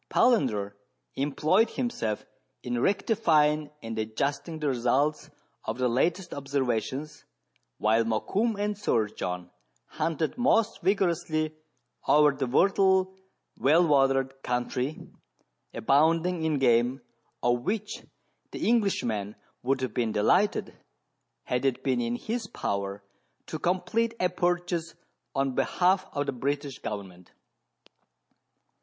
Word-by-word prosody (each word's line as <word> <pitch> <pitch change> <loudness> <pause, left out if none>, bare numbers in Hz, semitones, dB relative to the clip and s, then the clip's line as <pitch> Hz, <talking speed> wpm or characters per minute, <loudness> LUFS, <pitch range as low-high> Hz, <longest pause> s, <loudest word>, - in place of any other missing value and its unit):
Palander 110 - +2 0.4
employed 155 +10 +2
himself 115 - -3 0.4
in 120 -1 -2
rectifying 155 - +2
and 115 -1 -4
adjusting 140 +9 -2
the 150 -1 -2
results 135 +4 +1 0.3
of 110 - -4
the 125 0 +1
latest 165 +10 0
observations, 135 +1 -2 0.5
while 110 +2 +3
Mokoum 200 - 0
and 205 0 0
Sir 115 - 0
John 90 -3 -5 0.3
hunted 165 +6 -2
most 230 -3 +2
vigorously 165 -5 0 0.5
over 150 0 +6
the 135 -2 -3
fertile, 190 +5 +3 0.4
well 155 +8 +5
watered 135 -2 +2
country, 125 +3 -2 0.6
abounding 160 +6 +2
in 155 -2 +1
game, 125 0 +2 0.4
of 120 0 +2
which 210 - -3 0.5
the - - -3
Englishman 120 - +1 0.3
would 130 +1 0
have 130 -4 -2
been 115 -3 0
delighted, 180 - +2 0.7
had 125 0 -1
it 130 -1 0
been 130 -3 +1
in 120 0 -1
his 225 - -4
power, 100 - -3 0.4
to 155 - -5
complete 190 +7 0
a 180 - +2
purchase 175 -1 -1 0.4
on 135 -1 +1
behalf 185 +7 +2
of 145 0 -1
the 140 - -1
British 140 +1 -3
government. 95 -4 -7
145 Hz, 110 wpm, -28 LUFS, 120-180 Hz, 0.7 s, over